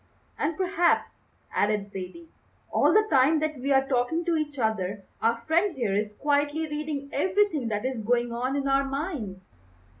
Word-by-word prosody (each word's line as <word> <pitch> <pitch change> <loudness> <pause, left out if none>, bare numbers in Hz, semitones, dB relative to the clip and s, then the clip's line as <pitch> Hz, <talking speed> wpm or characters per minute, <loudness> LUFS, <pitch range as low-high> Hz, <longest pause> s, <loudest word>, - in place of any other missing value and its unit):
"And 305 +1 -1
perhaps," 365 -2 +1 0.3
added 205 -1 0
Zaidie, 200 - -8 0.4
"all - - +4
the 430 0 +4
time 280 +3 +5
that 310 -2 -2
we 275 +3 -1
are 270 0 +4
talking 270 +6 0
to 340 -1 +1
each 300 -2 -2
other 205 -4 -1 0.2
our 230 +1 +2
friend 340 +5 +2
here 230 -6 -1
is 210 +1 -1
quietly 290 +3 0
reading 295 -2 -4
everything 365 - +1
that 210 +1 -2
is 260 -3 -2
going 240 +2 +1
on 255 +3 -1
in 280 -1 -1
our 275 0 +3
minds." 235 - -5
275 Hz, 170 wpm, -27 LUFS, 225-315 Hz, 0.4 s, time